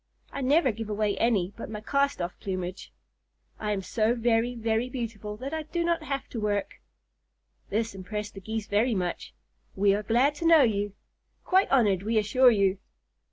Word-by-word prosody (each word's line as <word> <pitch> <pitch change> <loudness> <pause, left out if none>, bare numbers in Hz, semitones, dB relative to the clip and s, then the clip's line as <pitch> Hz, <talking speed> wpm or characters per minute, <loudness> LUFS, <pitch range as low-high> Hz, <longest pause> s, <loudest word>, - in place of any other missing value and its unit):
I 280 - -5
never 275 +1 +3
give 225 0 -6
away 210 -1 0
any 205 -5 +1
but 230 - -7
my 215 -1 -5
cast 280 -1 0
off 175 - -4
plumage. 185 -1 -5 0.7
I 210 -1 -2
am 195 -2 -2
so 225 +4 +1
very, 235 +1 +1
very 230 +1 -1
beautiful 220 -4 -5
that 270 +6 -6
I 320 - -1
do 340 +3 -3
not 335 -1 +1
have 275 -3 -4
to 235 - -5
work." 205 -1 -2 0.9
This 225 +2 -1
impressed 205 +2 -5
the 195 - -9
Geese 220 +2 -4
very 220 +3 +1
much. 180 -2 -3 0.4
"We 195 0 +3
are 205 - 0
glad 240 +7 +2
to 335 - -4
know 325 -3 +7
you. 205 -3 0 0.5
Quite 380 +1 +3
honored, 210 -9 +3
we 220 +3 0
assure 230 +5 +5
you!" 200 -4 +2
220 Hz, 180 wpm, -27 LUFS, 205-255 Hz, 0.9 s, know